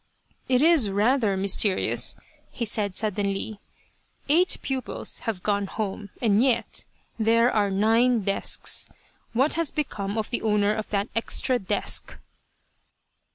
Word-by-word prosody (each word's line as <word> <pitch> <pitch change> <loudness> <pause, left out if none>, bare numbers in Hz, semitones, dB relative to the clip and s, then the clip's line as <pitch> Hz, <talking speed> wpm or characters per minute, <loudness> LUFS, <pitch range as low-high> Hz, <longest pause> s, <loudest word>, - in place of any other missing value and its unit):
" - - -38
It 250 - +3
is 315 -10 +5
rather 210 0 +2
mysterious," 195 0 +1 0.3
he 235 - -4
said, 205 -3 -1
suddenly, 205 0 -1 0.3
" - - -41 0.3
eight 350 +5 +4
pupils 260 -3 -2
have 185 -5 -4
gone 200 -1 0
home, 205 0 -5
and 215 -3 +3
yet, 240 -3 0 0.3
there 230 +2 +3
are 205 -2 +1
nine 225 +4 +3
desks. 195 +1 +1 0.5
What 265 +6 +2
has 330 -2 0
become 205 -8 -3
of 220 0 -3
the 240 - 0
owner 210 -1 +2
of 215 0 -5
that 200 0 -1
extra 245 +2 +1
desk 190 - -3
215 Hz, 135 wpm, -25 LUFS, 200-245 Hz, 0.5 s, is